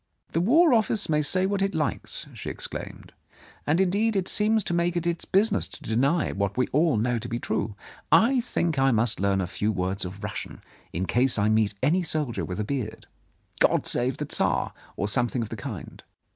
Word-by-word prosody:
"The 165 Hz, -, +1 dB
War 300 Hz, -, +5 dB
Office 220 Hz, -3 st, +2 dB
may 150 Hz, -1 st, +3 dB
say 185 Hz, +5 st, +2 dB
what 200 Hz, 0 st, 0 dB
it 195 Hz, 0 st, 0 dB
likes," 155 Hz, -2 st, -2 dB
she -, -, -6 dB
ex -, -, -5 dB
claimed, -, -, -8 dB, 0.5 s
"and, 155 Hz, +4 st, +3 dB
indeed, 205 Hz, +4 st, +2 dB
it 190 Hz, -2 st, 0 dB
seems 215 Hz, 0 st, +2 dB
to 175 Hz, -, -2 dB
make 170 Hz, 0 st, +1 dB
it 170 Hz, -, -2 dB
its 170 Hz, -1 st, -1 dB
busi 205 Hz, +4 st, +3 dB
ness -, -, 0 dB
to -, -, -13 dB
deny 135 Hz, +9 st, +1 dB
what 100 Hz, +1 st, -2 dB
we 130 Hz, -, +3 dB
all 150 Hz, -3 st, +2 dB
know 120 Hz, +2 st, 0 dB
to 120 Hz, -, -6 dB
be 120 Hz, -, -2 dB
true. 110 Hz, -2 st, -2 dB, 0.4 s
I 250 Hz, +3 st, +5 dB
think 170 Hz, -, -1 dB
I 135 Hz, 0 st, +4 dB
must 115 Hz, -1 st, +1 dB
learn 100 Hz, 0 st, +1 dB
a -, -, -1 dB
few 105 Hz, +4 st, -1 dB
words 95 Hz, 0 st, -2 dB
of 95 Hz, +3 st, -7 dB
Russian, 105 Hz, -, -6 dB, 0.3 s
in 90 Hz, +3 st, -2 dB
case 125 Hz, +4 st, +2 dB
I 105 Hz, +1 st, +2 dB
meet 110 Hz, -1 st, +2 dB
any 165 Hz, +7 st, +3 dB
soldier 150 Hz, -7 st, -2 dB
with 90 Hz, +2 st, -5 dB
a -, -, 0 dB
beard 110 Hz, -1 st, -4 dB, 0.2 s
— -, -, -40 dB
' -, -, -23 dB
God -, -, +3 dB
Save 125 Hz, +1 st, +1 dB
the -, -, -3 dB
Tsar! -, -, 0 dB
' -, -, -26 dB
or 100 Hz, -, -1 dB
something 120 Hz, +3 st, 0 dB
of 110 Hz, -, -7 dB
the -, -, -5 dB
kind. 95 Hz, -, -7 dB
135 Hz, 225 wpm, -26 LUFS, -, 0.5 s, War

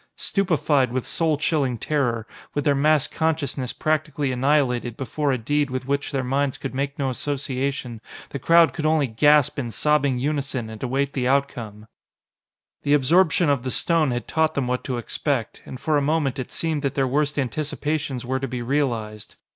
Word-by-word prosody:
Stupefied 150 Hz, -, +1 dB
with 130 Hz, 0 st, -2 dB
soul 160 Hz, -3 st, 0 dB
chilling 140 Hz, -5 st, 0 dB
terror, 120 Hz, -4 st, -1 dB, 0.3 s
with 145 Hz, -, 0 dB
their 145 Hz, -, +4 dB
mass 150 Hz, +1 st, +3 dB
consciousness 150 Hz, -5 st, -1 dB
practically 150 Hz, -3 st, -1 dB
annihilated 125 Hz, -3 st, +1 dB
before 140 Hz, +3 st, -1 dB
a 130 Hz, -, +1 dB
deed 145 Hz, +5 st, 0 dB
with 130 Hz, 0 st, -4 dB
which 140 Hz, +1 st, -1 dB
their 135 Hz, -2 st, -1 dB
minds 135 Hz, +1 st, 0 dB
could 135 Hz, -, -5 dB
make 140 Hz, +1 st, -2 dB
no 135 Hz, -2 st, 0 dB
association, 135 Hz, -3 st, -3 dB, 0.3 s
the 140 Hz, -, -5 dB
crowd 165 Hz, +4 st, +5 dB
could 155 Hz, -2 st, -1 dB
only 155 Hz, -2 st, +3 dB
gasp 145 Hz, +4 st, +3 dB
in 120 Hz, -4 st, -3 dB
sobbing 145 Hz, +2 st, +1 dB
unison 135 Hz, -4 st, -2 dB
and 110 Hz, -, -9 dB
await 135 Hz, +2 st, -1 dB
the 125 Hz, -2 st, -1 dB
outcome. 115 Hz, -6 st, -1 dB, 1.0 s
The 145 Hz, +1 st, +3 dB
absorption 165 Hz, +4 st, +3 dB
of 140 Hz, -3 st, +2 dB
the 130 Hz, -, -3 dB
stone 160 Hz, +2 st, +2 dB
had 120 Hz, -2 st, -3 dB
taught 160 Hz, 0 st, +1 dB
them 140 Hz, -, 0 dB
what 125 Hz, 0 st, -1 dB
to 125 Hz, -2 st, -2 dB
expect, 120 Hz, 0 st, -2 dB
and 130 Hz, -, -7 dB
for 155 Hz, +4 st, +1 dB
a -, -, +2 dB
moment 145 Hz, -2 st, 0 dB
it 130 Hz, -, -5 dB
seemed 160 Hz, -3 st, -2 dB
that 140 Hz, -2 st, -2 dB
their 135 Hz, -1 st, +2 dB
worst 145 Hz, +3 st, 0 dB
anticipations 145 Hz, 0 st, -2 dB
were 130 Hz, +2 st, -1 dB
to 135 Hz, -, -3 dB
be 125 Hz, -1 st, -4 dB
realised. 115 Hz, -6 st, -2 dB
140 Hz, 180 wpm, -23 LUFS, 125-150 Hz, 1.0 s, crowd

